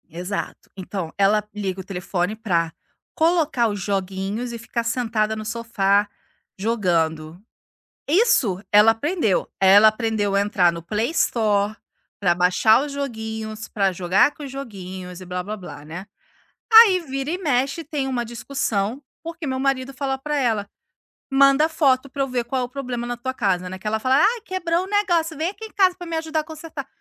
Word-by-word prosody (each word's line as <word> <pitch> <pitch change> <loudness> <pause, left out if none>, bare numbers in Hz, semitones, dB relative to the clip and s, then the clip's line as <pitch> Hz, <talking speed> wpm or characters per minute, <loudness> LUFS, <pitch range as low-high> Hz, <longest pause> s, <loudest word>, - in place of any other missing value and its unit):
Exato, 180 +5 -5
então 185 -3 -5
ela 205 +2 +3
liga 195 -2 -3
o - - -5
telefone 180 +1 -3
para 170 -7 -1 0.4
colocar 315 -7 +2
os 205 -1 -4
joguinhos 195 +4 -3
e 235 - -5
ficar 235 0 -3
sentada 225 -2 0
no 215 0 -6
sofá 210 -3 +1 0.5
jogando. 170 -6 -1 0.7
Isso 290 - +3
ela 210 +2 +7
aprendeu, 225 - 0
ela 200 +3 +7
aprendeu 215 -3 -1
a 200 - +4
entrar 195 -4 +3
no 170 0 -7
PlayStore, 215 - 0 0.4
para 175 -4 +2
baixar 180 +6 +4
os 295 - -7
joguinhos, 220 -5 -5
para 195 -2 +1
jogar 185 +9 +2
com 300 - -11
os 275 - -7
joguinhos 185 -8 -8
e - - -9
blá-blá-blá, 180 -4 -6
né, 175 +5 -8 0.7
aí 440 -5 +8
vira 270 -2 -4
e 355 - -1
mexe 280 -2 0
tem 290 -3 -3
uma 250 -2 -1
discussão, 235 -1 -2 0.2
porque 330 -1 -6
meu 260 -1 -2
marido 270 0 -1
fala 270 0 -2
para 295 +2 -3
ela, 225 -7 +1 0.6
manda 275 +2 +5
foto 275 -4 +2
para 275 +1 -4
eu - - -2
ver 250 -1 -1
qual 255 +2 -2
é - - 0
o - - -11
problema 250 -3 -4
na 245 0 -4
tua 260 +2 -4
casa, 185 -7 0
né, 185 +1 -7
que 210 - -7
ela 220 +1 0
fala; 260 +4 +2
"Ai 440 +9 +3
quebrou 365 -4 -1
o - - -7
negócio, 350 -6 +1
vem 320 +3 0
aqui 425 +3 -9
em 435 - -11
casa 375 -2 +3
para 355 -2 -8
me 330 - -3
ajudar 320 -1 -2
consertar", 315 -3 -8
230 Hz, 175 wpm, -22 LUFS, 195-280 Hz, 0.7 s, aí